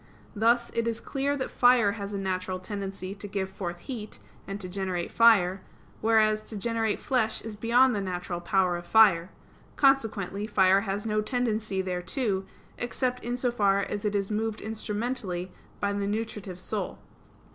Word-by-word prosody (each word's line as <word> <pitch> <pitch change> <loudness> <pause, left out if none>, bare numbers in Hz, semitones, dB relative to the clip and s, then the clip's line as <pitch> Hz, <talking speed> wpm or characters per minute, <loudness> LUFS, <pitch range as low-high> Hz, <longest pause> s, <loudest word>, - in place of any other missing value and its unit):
Thus 235 +3 +2
it 230 0 -1
is 230 0 -1
clear 280 +1 -1
that 260 - -3
fire 245 -4 +5
has 200 -1 -5
a 200 - -3
natural 185 -1 -2
tendency 195 0 -5
to 205 0 -8
give 190 -1 -3
forth 175 -3 -5
heat, 220 -3 -7 0.3
and 195 +1 -4
to 185 - -5
generate 180 -2 -3
fire; 195 -5 +5 0.4
whereas 215 -1 +4
to 215 - -7
generate 225 0 0
flesh 230 -5 0
is 225 -2 -6
beyond 240 +4 +4
the 205 - -1
natural 180 -2 -3
power 180 0 +2
of 175 - -9
fire; 195 -6 +5 0.5
consequently, 215 -7 +2
fire 190 -2 +4
has 200 0 -3
no 215 -1 +1
tendency 215 -5 -1
thereto, 190 +3 -1 0.3
except 250 +1 -2
in 245 +1 -2
so 245 -1 0
far 200 -4 +2
as 205 - -4
it 210 -1 0
is 200 0 -1
moved 220 0 -1
instrumentally 210 -4 -3 0.3
by 200 0 0
the 200 0 -1
nutritive 205 -3 -4
soul. - - -4
205 Hz, 165 wpm, -28 LUFS, 190-230 Hz, 0.5 s, fire